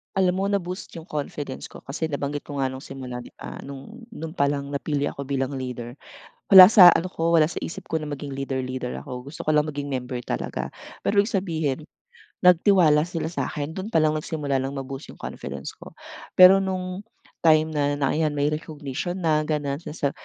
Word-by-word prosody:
Alam 185 -2 +2
mo, 190 - -1
na-boost 185 -2 -3
yung 160 - -13
confidence 145 -3 -5
ko. - - -10
Kasi 160 +3 -3
nabanggit 145 0 -3
ko 145 -1 -6
nga 135 - +2
nung 130 +1 -7
simula 125 -2 -7
di - - -13
ba - - -9
nung 140 - -10
nun 160 -5 -7
palang 140 0 0
napili 145 0 -2
ako 140 - -5
bilang 135 0 -2
leader, 125 -2 -6 0.5
wala 190 -1 +12
sa 185 -2 +9
ano 165 - -3
ko 165 +1 0
wala 155 - +6
sa 160 - -5
isip - - -6
ko 160 -1 -2
na 150 - -5
maging 145 -1 -5
leader 135 0 -3
leader 130 -1 -4
ako. 125 -1 -8
Gusto 155 - -8
ko 155 - +2
lang 150 0 +2
maging 145 -1 -4
member 130 -2 -4
talaga - - -4 0.3
pero, 200 -1 +4
ibig 205 - -3
sabihin 160 -9 -1 0.6
nagtiwala 180 -4 +5
sila 165 -2 -3
sakin 150 -3 -3
dun 190 +4 -6
pa 165 -8 +2
lang 155 0 +2
nagsimula 150 -3 -2
ng 135 +1 -3
ma-boost 135 +2 -8
yung - - -24
confidence - - -7
ko. - - -12 0.4
Pero 185 +1 +9
nung 185 0 -3 0.3
time 155 -1 +4
na 145 -2 0
ng 145 -1 0
yan 150 - -2
may 145 0 +1
recognition 155 +3 -4
na 155 -2 +2
ganun 145 -2 -1
sinasa 150 -3 -3
150 Hz, 195 wpm, -24 LUFS, 140-170 Hz, 0.6 s, wala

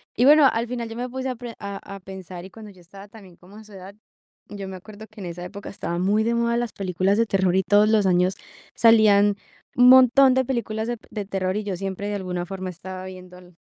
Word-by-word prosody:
Y 245 - +2
bueno, 295 -1 +7
al 230 +1 -2
final 235 -2 -5
yo 225 - -8
me 245 +1 -4
puse 260 +1 -4
a 255 - -3
pre 235 0 -8
a 200 0 -6 0.2
a - - -10
pensar, 185 -1 -10
y - - -11
cuando 215 -2 -12
yo 185 -2 -19
estaba 195 +4 -14
también 195 -6 -15
como 195 +4 -16
a 220 - -12
su 210 - -17
edad, 190 +1 -11 0.6
yo 200 -2 -7
me 190 - -7
acuerdo 215 +3 -12
que 215 -2 -13
en 180 - -6
esa 175 +1 -7
época 200 +2 -9
estaban 175 -2 -4
muy 210 +3 +2
de 235 +1 0
moda 235 0 0
las 240 -2 -2
películas 190 +1 0
de 230 - +3
terror 190 -3 +1
y 190 - +3
todos 205 +2 +4
los 215 -3 +3
años 180 +1 +2 0.4
salían 210 -3 +5 0.4
un 245 0 +6
montón 260 +1 +7
de 260 0 +2
películas 225 -3 -3
de 240 -1 -3
de 205 -2 -5
terror, 190 -1 -2
y 215 - -3
yo 195 -3 -4
siempre, 195 +1 -5
de 205 - -3
alguna 180 -2 -4
forma, 190 0 -6
estaba 185 +1 -8
viendo 185 -1 -11
el 180 -1 -19
200 Hz, 250 wpm, -23 LUFS, 185-230 Hz, 0.6 s, bueno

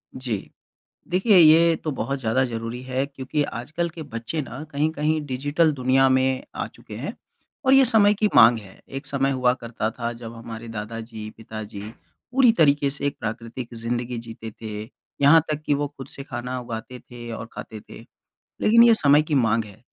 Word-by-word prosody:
जी। 120 -6 -4 0.6
देखिए, 190 +4 +3
ये 165 0 +7
तो 155 - -4
बहुत 140 +1 -3
ज़्यादा 125 +2 +1
ज़रूरी 115 0 -5
है 130 +1 -1
क्योंकि 140 +1 -2
आजकल 150 +8 -3
के 165 0 -8
बच्चे 125 +2 -4
ना 135 +1 -8
कहीं-कहीं 155 +1 0
डिजिटल 145 +5 +1
दुनिया 135 0 +3
में 130 0 +2
आ - - -3
चुके - - -13
हैं - - -5 0.5
और 265 - +4
ये 270 0 +7
समय 215 -4 +5
की 210 0 +1
माँग 115 0 +8
है। 100 -3 -14
एक 135 0 -7
समय 135 -1 0
हुआ 125 -2 +2
करता 115 -2 -3
था 115 0 -4
जब 115 -1 -9
हमारे 115 0 -8
दादाजी, 110 0 -6
पिताजी 110 -2 -8 0.5
पूरी 250 -3 +5
तरीके 145 -3 +4
से 140 +1 0
एक 140 - -2
प्राकृतिक 115 +2 -6
ज़िंदगी 120 +1 -3
जीते 115 -1 -8
थे, 105 -1 -7 0.4
यहाँ 150 +4 +7
तक 155 0 -2
कि 145 - +3
वो 145 +1 -1
खुद 135 - -8
से 140 - -8
खाना 125 -1 -5
उगाते 120 +1 -7
थे 120 -1 -10
और 115 0 -6
खाते 110 -1 -8
थे। - - -13 0.6
लेकिन 230 +2 +6
ये 235 -1 +7
समय 145 -6 +5
की 155 0 -2
माँग 115 -4 +2
है, 105 +1 -15
130 Hz, 185 wpm, -24 LUFS, 115-150 Hz, 0.6 s, माँग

